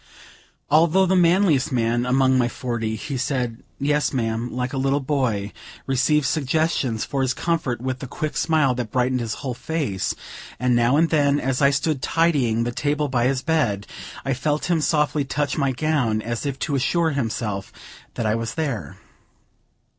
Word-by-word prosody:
Although 165 +5 +5
the 190 +1 +2
manliest 175 -6 +3
man 120 0 +1
among 130 +1 +3
my 125 -2 +3
forty, 120 -3 -3
he 135 +5 -4
said, 125 -3 -2 0.2
"Yes, 145 +1 +1
ma'am," 115 -2 -2
like 125 +1 -3
a 135 - -1
little 135 +1 +1
boy; 130 -8 -1 0.3
received 135 +3 +2
suggestions 140 -5 0
for 140 -2 -2
his 130 -1 0
comfort 155 -8 -1
with 130 0 -3
the 135 - -6
quick 155 +4 -4
smile 155 -5 +2
that 125 -3 -4
brightened 125 +1 +1
his 115 -2 -3
whole 130 - -1
face; 135 - -2 0.4
and 125 -1 +2
now 120 +4 +3
and 165 +1 +3
then, 145 -2 +3
as 130 +1 -1
I 140 - +6
stood 140 0 0
tidying 140 -9 +2
the 120 - -2
table 145 +3 -1
by 120 -2 +1
his 130 -1 -1
bed, 120 -11 0 0.4
I 135 - +1
felt 150 +6 -1
him 165 -2 +2
softly 150 -1 +1
touch 145 +1 -1
my 140 -3 +1
gown, 130 -6 0
as 120 +5 -3
if 135 -1 -3
to 150 - -1
assure 160 +5 +1
himself 110 -7 -3 0.4
that 115 - -2
I 105 - +2
was 115 +1 -3
there. 130 - -3
135 Hz, 175 wpm, -23 LUFS, 120-150 Hz, 0.4 s, I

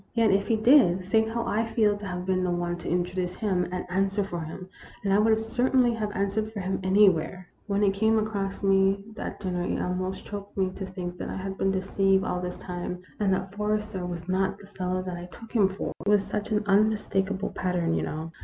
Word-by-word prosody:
Yet 225 -3 +4
if 200 +1 +2
he 225 - +3
did, 220 -6 +5
think 220 0 +4
how 235 +1 -2
I 220 +2 +1
feel 220 -2 +2
to 205 0 -7
have 180 -1 -4
been 185 -1 +1
the 180 - 0
one 175 0 -1
to - - -6
in 175 +1 +2
troduce 180 0 -3
him 185 -4 0
and 180 0 -3
answer 195 +2 +1
for 175 -3 -4
him, 165 +3 -7 0.4
and 195 -1 +2
I 200 - +5
would 220 +1 +4
cer 245 +3 0
tainly 245 -3 +4
have 210 -2 -2
answered 200 +2 -1
for 215 - -5
him 190 0 -2
anywhere! 185 -2 +3 0.2
"When 200 0 +1
it 195 -1 +4
came 220 +3 +3
across 205 -3 -2
me 195 0 +3
at - - -5
dinner 180 -3 -2
it 175 - -1
almost 185 +1 -2
choked 200 -1 -7
me 190 -1 +1
to 190 0 -6
think 180 -2 -6
that - - -4
I - - -4
had 190 0 -4
been 195 - +1
deceived 195 0 +2
all 180 - -1
this 180 0 -4
time, 180 0 -5 0.2
and 200 -2 +2
that 190 0 -1
Forrester 210 -2 -2
was 175 -1 -5
not 190 +1 0
the - - -14
fellow 185 -2 -3
that 180 -1 -5
I 175 - -7
took 225 +5 -13
him 210 -5 +4
for. 190 - -4
It 200 - 0
was 205 -1 +4
such 210 -1 -3
an 210 0 +2
unmistakable 200 -1 +1
pat 180 -1 -2
tern, 165 -2 +1
you - - +1
know. 160 +1 -4
195 Hz, 240 wpm, -27 LUFS, 180-210 Hz, 0.4 s, did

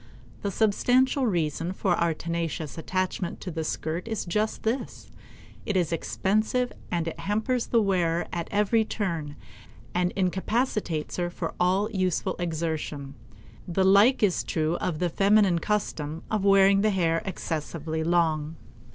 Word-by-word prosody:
The 200 - -1
substantial 245 +6 +2
reason 170 -2 -1
for 190 -1 +1
our 170 -2 +1
tenacious 165 -2 -3
attachment 185 +1 -2
to 185 - -5
the 160 0 -3
skirt 160 +4 -3
is 220 -3 -3
just 210 +5 -1
this; 235 +4 -3 0.5
it 205 -4 -1
is 170 -3 +1
expensive 215 +8 0 0.2
and 170 -2 -1
it 165 - -5
hampers 220 +7 -1
the 230 -2 +3
wearer 175 -4 +1
at 170 -1 -3
every 210 +2 +2
turn 165 -9 -3 0.6
and 180 0 +1
incapacitates 190 -2 -1
her 175 -1 0
for - - -4
all 185 +3 +2
useful 185 -2 0
exertion. 160 -4 -3 0.5
The 185 +2 +1
like 200 +6 +5
is 190 -4 +2
true 160 +1 0
of 170 -4 -2
the 180 - +1
feminine 200 -1 +4
custom 165 -6 -2
of 215 -3 0
wearing 195 0 +5
the 215 - +3
hair 165 -4 +1
excessively 160 -4 -3
long. 160 -2 +1
180 Hz, 140 wpm, -26 LUFS, 165-205 Hz, 0.6 s, like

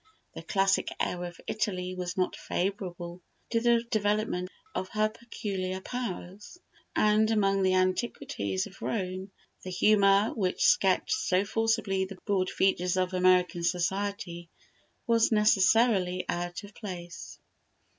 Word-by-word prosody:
The - - -7
classic 195 0 +1
air 180 0 -1
of 175 -1 -9
Italy 185 -4 -2
was 180 0 -5
not 185 - 0
favourable 180 -2 -4 0.3
to 230 - +2
the 235 -1 +3
development 205 -3 0 0.2
of 185 - -3
her 215 0 +2
peculiar 195 -5 -4
powers, 210 - -6 0.4
and 215 +1 +3
among 195 -3 +2
the 185 0 +3
antiquities 185 - -1
of 185 - -14
Rome 185 -2 -3 0.3
the 185 - -7
humour 200 +2 +4
which 210 - 0
sketched - - +3
so 200 - +1
forcibly 220 -3 0
the 190 0 -9
broad 190 -3 +1
features 180 -1 +1
of 185 0 0
American 180 -1 +3
society 180 0 -2 0.6
was 230 -1 +3
necessarily 210 -3 +3
out 175 +3 -3
of 205 0 -12
place. 175 -5 -8
195 Hz, 125 wpm, -29 LUFS, 180-215 Hz, 0.6 s, humour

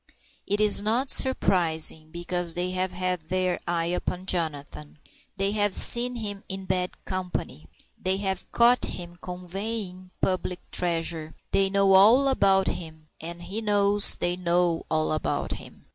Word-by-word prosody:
It 205 +1 -1
is 210 -1 +4
not 235 +6 +2
surprising, 160 - +1
because 175 0 -1
they 180 +1 -1
have 185 0 -2
had 180 -3 -3
their 185 -1 -1
eye 170 -1 0
upon 180 +1 -3
Jonathan. 150 -4 -2 0.4
They 195 0 +1
have 205 -2 +1
seen 245 +1 +4
him 205 -3 -5
in 190 0 -4
bad 180 -1 -2
company. 180 - -5 0.3
They 190 +1 0
have 195 -1 -4
caught 240 +1 +4
him 175 0 -7
"conveying" 185 +1 -4
public 185 -1 -3
treasure. 165 -2 -1 0.2
They 195 0 +3
know 195 0 +3
all 225 +8 +6
about 195 -7 +3
him, 160 -3 -6
and 170 +2 -7
he 205 +5 -5
knows 205 -1 +2
that - - -4
they 175 0 +1
know 175 -1 0
all 155 0 0
about 155 - -2
him. - - -10
185 Hz, 150 wpm, -25 LUFS, 170-200 Hz, 0.4 s, all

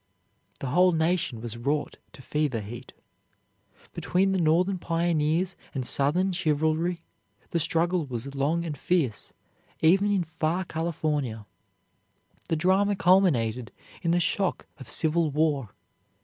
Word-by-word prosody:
The 135 - -3
whole 180 +4 +4
nation 160 -7 0
was 115 -1 -6
wrought 145 +5 -2 0.2
to 140 -5 -13
fever 150 -6 -1
heat. 120 +5 -9 1.0
Between 190 +2 +1
the 190 -2 +1
Northern 180 +4 +2
pioneers 165 +1 0 0.2
and 130 -2 -2
Southern 165 +10 +1
chivalry 160 0 0 0.5
the 170 - +1
struggle 165 0 0
was 130 +2 -5
long 150 +5 0
and 155 -3 -4
fierce, 145 - -1 0.5
even 190 +6 +4
in 200 -3 +2
far 160 +3 -2
California. 150 -9 -2 1.0
The 165 - +2
drama 190 +5 +2
culminated 135 - +2 0.3
in 170 - -1
the 175 +1 +3
shock 190 +2 0
of 130 -4 -10
civil 160 +3 +1
war. 145 -5 0
160 Hz, 125 wpm, -27 LUFS, 140-175 Hz, 1.0 s, whole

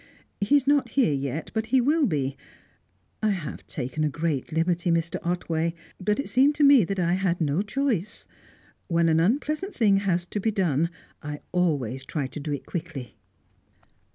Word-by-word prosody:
He 205 +8 +3
is 280 -2 +3
not 280 -3 +3
here 245 - +2
yet, 140 +2 -3
but 220 -1 -1
he 260 - +4
will 290 +3 +3
be 140 -6 -1 0.9
I 215 - +2
have 175 -8 -4
taken 145 +3 -3
a 155 - +2
great 150 -1 -2
liberty, 170 +2 +1
Mr. 165 0 +1
Otway; 170 -1 -1 0.2
but 210 +5 0
it 280 - -2
seemed 275 +4 +4
to 295 - +2
me 280 -5 +7
that 195 +3 -3
I 175 -1 +1
had 185 -2 0
no 155 +2 +1
choice. 215 -3 -1 0.6
When 170 -1 +2
an 160 0 +3
unpleasant 300 - 0
thing 205 -5 +4
has 180 -3 0
to 205 - -4
be 220 - +1
done, 170 -6 +1 0.3
I 150 -1 -6
always 140 -8 0
try 140 +1 -3
to 130 - -6
do 150 +1 -4
it 145 - -4
quickly." 160 -8 -6
175 Hz, 180 wpm, -26 LUFS, 155-220 Hz, 0.9 s, me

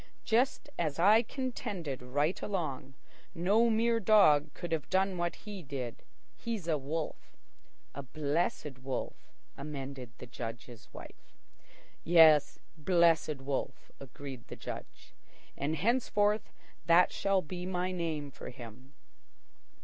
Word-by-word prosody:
"Just 250 +6 +1
as 155 -4 -1
I 205 +6 +6
contended 205 - -4
right 145 +7 -1
along. 150 -8 -3 0.4
No 205 +7 +3
mere 230 +1 +2
dog 155 -9 +5
could 175 -2 -6
have 160 -3 -2
done 190 0 +2
what 175 -1 -1
he 205 -3 -8
did. 135 -6 -6 0.3
He's 220 -7 -5
a 160 - +2
wolf." 150 +3 -5 0.6
"A 140 - -5
Blessed 145 0 -2
Wolf," 130 0 -5 0.2
amended 140 -3 -6
the - - -9
Judge's 115 -1 -8
wife. - - -13 0.7
"Yes, 160 -3 +6 0.2
Blessed 165 -3 +2
Wolf," 135 0 -4
agreed 135 -2 -9
the - - -8
Judge. - - -9 0.4
"And 150 +3 -1
henceforth 210 - +1 0.4
that 170 +1 +6
shall 195 -2 +1
be 180 +3 -6
my 180 0 -1
name 160 -5 -3
for - - -9
him." 125 +3 -12
160 Hz, 120 wpm, -31 LUFS, 140-190 Hz, 0.7 s, I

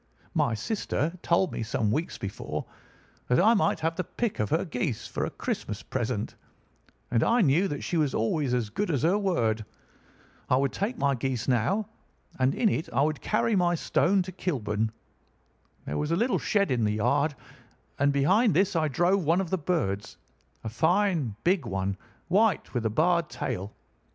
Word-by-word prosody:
"My 115 - +1
sister 160 - -1
had 180 0 -16
told 175 +1 +2
me - - -4
some 110 -1 0
weeks 155 +8 -2
before 100 -1 -5 0.6
that 125 - +3
I 220 +5 +6
might 210 - +1
have 165 +1 0
the 185 - 0
pick 230 +5 -3
of 105 -1 0
her 165 - +1
geese 125 - -3
for - - -2
a - - -3
Christmas - - -4
present, - - -2 0.8
and 115 -1 +3
I 235 +1 +3
knew 170 +3 +3
that 145 -4 -4
she 175 - -1
was 150 -4 +1
always 130 +4 0
as 115 -4 -2
good 205 - -2
as 145 -4 0
her 180 +6 +3
word. 115 - 0 0.9
I - - +4
would 135 0 +1
take 225 +5 -2
my 140 -6 +2
goose 130 -2 -2
now, 160 - +1 0.5
and 130 +1 +2
in 230 - +2
it 165 -5 -1
I 135 +3 +2
would 155 -1 -1
carry 215 +1 +1
my 175 -2 +3
stone 185 +3 +2
to 185 - -7
Kilburn. 110 - -2 0.9
There 75 - -3
was 150 - -1
a 165 - +2
little 235 +7 +1
shed 200 -5 +1
in 120 -3 +1
the 105 0 +1
yard, 140 +7 +1 0.6
and 145 +1 +4
behind 185 - +3
this 190 +2 +2
I 160 -1 +2
drove 175 +6 +2
one 165 +4 +3
of 190 -4 -3
the 190 - +2
birds—a 115 - -4
fine 165 - +1
big 175 -8 +2
one, 95 -1 -1 0.3
white, 200 +1 +2
with 120 -3 0
a - - -1
barred 170 +6 +2
tail. 95 +3 -4
155 Hz, 185 wpm, -27 LUFS, 120-185 Hz, 0.9 s, I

